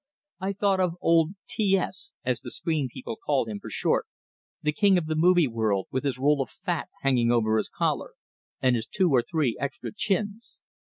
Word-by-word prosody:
I 190 +1 -2
thought 200 -1 +1
of 180 -2 +1
old 165 +2 +3
"T 195 -3 +3
S," 190 +8 -4
as 125 -2 0
the - - -7
screen 155 -5 -1
people 125 -3 -6
call 140 -1 0
him 105 -2 -5
for - - -9
short - - 0 0.6
the 150 - +2
king 200 +3 +4
of 175 - -1
the 155 - -1
movie 170 0 +4
world, 110 -5 0
with 130 +2 -2
his 135 -3 0
roll 140 +2 +3
of 135 - -3
fat 180 -3 -3
hanging 125 -3 +3
over 110 -2 +2
his - - -1
collar, - - -2 0.4
and 130 -1 +3
his 115 -1 -3
two 185 -5 +1
or 130 -3 +5
three 145 -3 0
extra 140 - -4
chins! 210 +2 -2
150 Hz, 200 wpm, -26 LUFS, 125-185 Hz, 0.6 s, or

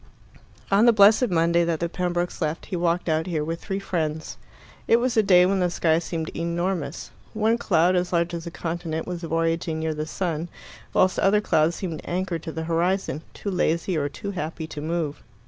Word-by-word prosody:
On 205 +4 +5
the 235 - +7
blessed 215 +4 +6
Monday 170 0 +3
that 165 -2 -1
the 170 - 0
Pembrokes 175 0 -2
left, 155 0 -2
he 190 - -4
walked 175 0 0
out 160 +1 +1
here 160 -4 -1
with 165 +2 -4
three 195 -1 -3
friends. 160 -5 -3 0.5
It - - +6
was 240 0 +1
a 220 - +6
day 180 -3 +6
when 195 +1 +1
the 180 -1 +2
sky 165 -2 +2
seemed 165 -2 -4
enormous. 170 -2 -2 0.2
One 220 +2 +2
cloud, 180 -2 +3
as 180 0 0
large 170 0 +1
as 170 0 -5
a - - -2
continent, 165 -1 -4
was 180 -1 -5
voyaging 165 -1 -1
near 160 0 -1
the 155 0 -4
sun, 170 -1 -3 0.4
whilst 185 0 +3
other 200 +2 +4
clouds 165 -5 +2
seemed 165 -5 -5
anchored 180 -2 -2
to 160 - -6
the 160 0 -4
horizon, 170 -1 0
too 200 - -4
lazy 170 0 0
or 145 -2 0
too 200 +8 -6
happy 165 -3 -4
to 155 -2 -7
move. 160 -2 -2
170 Hz, 200 wpm, -24 LUFS, 160-185 Hz, 0.5 s, the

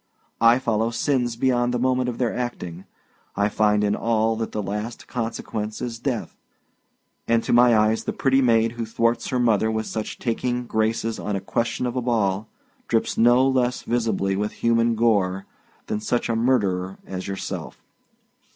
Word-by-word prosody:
I 115 +1 +6
follow 115 -3 0
sins 120 0 0
beyond 120 0 +1
the 125 - 0
moment 130 0 +1
of 120 - -5
their 120 -3 -1
acting; 95 -8 -5 0.5
I 100 +1 +1
find 105 -1 +2
in 105 0 +1
all 115 -1 +1
that 115 0 -3
the 105 - -3
last 105 +4 -5
consequence 110 -3 -4
is 115 -2 -5
death, 125 -2 -3 0.9
and 115 0 +2
to - - 0
my 120 -1 +6
eyes, 110 +1 +2
the - - -1
pretty 135 0 +2
maid 115 -2 +3
who 120 -1 -4
thwarts 115 +1 0
her 130 - -1
mother 110 -3 +2
with 110 0 -1
such 110 0 -4
taking 125 +1 -2
graces 110 0 -1
on 105 - -2
a - - -1
question 120 +5 -2
of 120 0 -3
a 125 - 0
ball, 110 -4 0 0.4
drips 115 - 0
no 120 +3 +5
less 125 -2 0
visibly 110 -5 0
with 105 +2 -2
human 115 0 +2
gore 100 -4 +1 0.4
than 105 - -2
such 120 +3 -1
a 115 - +1
murderer 100 -6 +1
as 95 -1 -6
yourself. 100 0 -6
115 Hz, 170 wpm, -23 LUFS, 105-120 Hz, 0.9 s, I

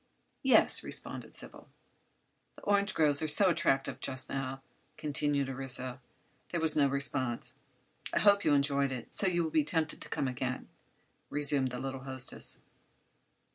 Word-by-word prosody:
"Yes," 265 -2 +4
responded - - -2
Sybil. - - -9 0.9
"The - - -16
orange 200 0 +1
groves 150 -3 +3
are 155 - -1
so 185 +6 +5
attractive, 135 -4 0
just 130 -1 0
now," 135 0 -4 0.3
continued 145 -2 0
Orissa. 130 -1 -2 0.5
There 170 - -2
was 160 -1 +6
no 145 -2 +4
response. 135 -3 0 0.6
"I - - -1
hope 200 -1 +4
you 150 - +3
enjoyed 140 -1 +1
it, 125 -2 -7
so 195 - +2
you 175 -2 +1
will 160 - -3
be 155 -1 +2
tempted 160 0 -1
to - - -4
come 135 - -2
again," 130 0 -4 0.6
resumed 145 -2 +2
the 125 - -6
little 135 +1 -5
hostess. 130 -1 -4
140 Hz, 150 wpm, -31 LUFS, 130-155 Hz, 0.9 s, was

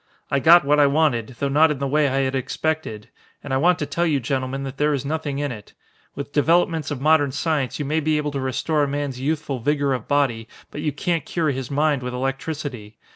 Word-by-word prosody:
I 140 - +2
got 165 +2 +6
what 150 +1 +3
I 145 - +6
wanted, 140 -6 +1
though 140 - -1
not 150 +4 +4
in 150 - -1
the 140 - -2
way 150 +1 +2
I 135 0 +1
had 130 0 -1
expected. 135 -4 -3 0.3
And 145 - -4
I - - +3
want 175 +5 +3
to 150 - -2
tell 170 +5 -1
you 150 -3 +1
gentlemen 130 +2 -2
that 135 0 -6
there 150 +1 +2
is 135 0 -4
nothing 150 -1 -3
in 145 -1 -2
it. 105 -4 -10 0.4
With 140 +1 -6
developments 165 0 +2
of 145 - -4
modern 145 -1 +3
science 145 -3 -1
you 150 - -3
may 155 +3 0
be 155 0 +1
able 150 -1 -2
to 140 - -3
restore 135 +4 -1
a 145 - +2
man's 140 -2 -3
youthful 145 -1 -2
vigor 140 +2 +1
of 125 -4 -4
body, 130 -6 +1 0.2
but 145 - -6
you 150 -1 0
can't 165 +2 -1
cure 155 -1 -1
his 130 -2 -5
mind 145 -1 +1
with 125 0 -4
electricity. 135 -4 -4
145 Hz, 235 wpm, -22 LUFS, 135-155 Hz, 0.4 s, got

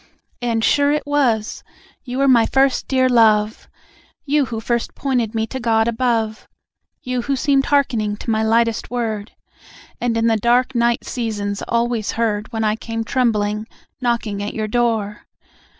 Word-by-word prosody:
And 230 -2 0
sure 285 +3 +3
it 300 0 -1
was! 250 -7 0 0.4
You 250 0 -5
were 275 0 +2
my 235 -4 +5
first 270 -1 +2
dear 260 -1 +2
love! 220 -3 +3 0.6
You 290 0 +2
who 230 -3 -5
first 235 +1 -2
pointed 245 -5 -1
me 220 0 0
to 260 +4 -6
God 225 -1 +2
above; 230 -2 -1 0.6
You 250 -1 -2
who 275 +3 -1
seemed 275 0 +1
hearkening 230 -8 +1
to 230 - -4
my 220 0 +1
lightest 230 0 +1
word, 225 -3 -3 0.7
And 235 -2 0
in 225 - +1
the 225 -1 +3
dark 245 +4 +2
night 235 0 +1
seasons 205 -4 -3
always 235 -2 0
heard 220 -1 -1
When 225 -2 -2
I 215 0 +1
came 225 0 -4
trembling, 215 -3 0 0.3
knocking 235 -4 -1
at 205 - -4
your 215 -1 -2
door. 220 -3 -1
230 Hz, 160 wpm, -20 LUFS, 220-250 Hz, 0.7 s, my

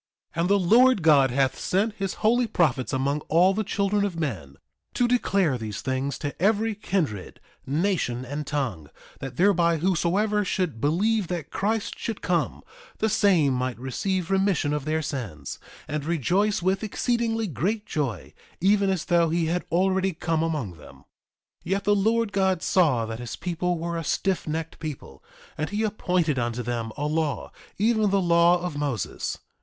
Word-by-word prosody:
3:13 165 - -1
And 175 - +1
the 200 - +5
Lord 230 +4 +5
God 145 -4 +6
hath 135 +1 +1
sent 205 +4 0
his 195 -3 -3
holy 240 +2 +4
prophets 145 - +1
among 140 +2 0
all 180 +4 +5
the 215 +2 -1
children 200 0 0
of 185 -5 -2
men, 95 - -4 0.4
to 245 - +3
declare 195 - +1
these 110 -3 -5
things 130 +2 -2
to 145 +1 -6
every 215 +3 +2
kindred, 170 - -3 0.3
nation, 145 -5 0
and 145 +3 -5
tongue, 115 - -3 0.3
that 135 -2 -7
thereby 170 -3 +3
whosoever 190 +5 +1
should 180 - -2
believe 200 +7 +1
that 175 -3 -4
Christ 215 +2 -2
should 225 -3 -4
come, 175 -3 -1 0.3
the 220 - +1
same 185 -10 +3
might 125 -1 -2
receive 180 +9 -2
remission 190 -6 +2
of 150 -2 -2
their 155 +1 0
sins, 115 - -5 0.3
and 150 0 -3
rejoice 180 - +1
with 190 +2 +1
exceedingly 225 +1 0
great 205 - -2
joy, 140 -8 -3 0.3
even 200 +1 +3
as 190 -4 -1
though 170 -1 +3
he 165 +1 +1
had 175 +2 -1
already 190 +2 +2
come 165 0 -1
among 145 - -2
them. - - -14
3:14 - - -21 0.6
Yet 195 +3 -1
the 205 0 +3
Lord 220 +2 +1
God 190 -3 +1
saw 145 -11 +3
that 110 0 -6
his 120 -2 -5
people 180 0 -2
were 170 +1 -3
a - - -4
stiffnecked 165 -2 -2
people, 155 -4 -7 0.4
and 155 - -1
he 210 +2 -1
appointed 180 -8 0
unto 120 0 -2
them 115 -1 -3
a 145 - -2
law, 150 -2 -1 0.3
even 215 0 +2
the 195 0 +2
law 170 0 +4
of 175 -4 -3
Moses. 140 - -3
170 Hz, 170 wpm, -25 LUFS, 145-200 Hz, 0.6 s, God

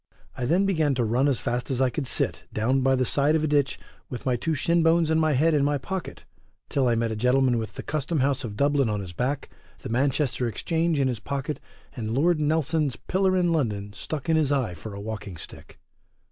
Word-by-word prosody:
I 125 - -3
than 175 +9 +3
began 160 -7 +1
to 125 - +1
run 120 +5 +2
as 135 -5 +1
fast 120 0 -2
as 130 -2 -1
I 130 -1 +3
could 140 -2 -3
sit - - 0
down 125 +5 +1
by 135 0 +3
the 130 0 +1
side 145 +5 +2
of 155 - +1
a - - +2
ditch 145 -2 +1 0.3
with 125 - -7
my 130 -2 +2
two 160 +6 -1
shin 170 +4 +2
bones 165 0 +3
and 160 0 +3
my 155 -1 +2
head 155 +5 +3
in 145 -2 +3
my 145 0 +2
pocket, 190 +6 -6 0.4
till 135 -3 +1
I 120 - +3
met 115 0 0
a - - -2
gentleman 125 +1 +2
with 110 -2 -5
the - - -6
custom 155 +1 -2
house 135 0 +1
of 105 -3 -6
Dublin 140 -3 +2
on 105 -1 -1
his 90 -3 -8
back, 130 +8 -2 0.3
the - - -5
Manchester 130 +1 +1
exchange 160 +7 0
in 135 - +3
his 125 -4 -2
pocket, 140 +3 -4 0.4
and 115 -1 -3
Lord 165 +4 +3
Nelson's 155 -2 +1
pillar 185 +5 +1
in 175 -2 +2
London 105 -9 -1
stuck 145 +7 -5
in 160 -1 +3
his 150 -3 +2
eye 130 -9 0
for 100 +5 -8
a - - -7
walking 105 -3 -6
stick. - - -11
135 Hz, 230 wpm, -26 LUFS, 120-155 Hz, 0.4 s, than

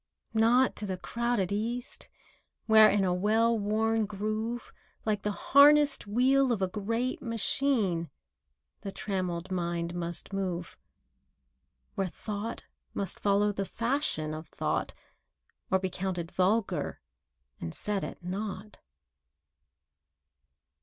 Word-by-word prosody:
] - - -37 0.2
Not 255 +2 +4
to 210 - -4
the 185 -1 -3
crowded 235 -1 -1
East, 235 +5 -3 0.6
Where, 220 -1 +8
in 205 -1 +2
a 180 -1 +2
well 220 +5 +2
worn 220 +1 +1
groove, 215 +3 -3 0.3
Like 210 -2 0
the 210 - -1
harnessed 285 +2 +5
wheel 260 +4 +3
of 230 - +1
a 190 - +1
great 225 +6 -2
machine, 230 - 0 0.7
The 195 - -5
trammelled 185 -3 -3
mind 170 -1 -2
must 170 +2 -5
move— 180 -3 -3 1.2
Where 195 - -1
Thought 210 +5 -5 0.3
must 200 - -3
follow 205 +1 +3
the 200 -1 -2
fashion 230 - -1
of 155 +1 -7
Thought, - - -2 0.7
Or 190 - +4
be 190 -1 -3
counted 175 -2 -3
vulgar 195 +3 0 0.6
and 80 - -5
set 205 -2 -1
at - - -7
naught. 200 +2 -5
205 Hz, 120 wpm, -29 LUFS, 185-230 Hz, 1.2 s, Where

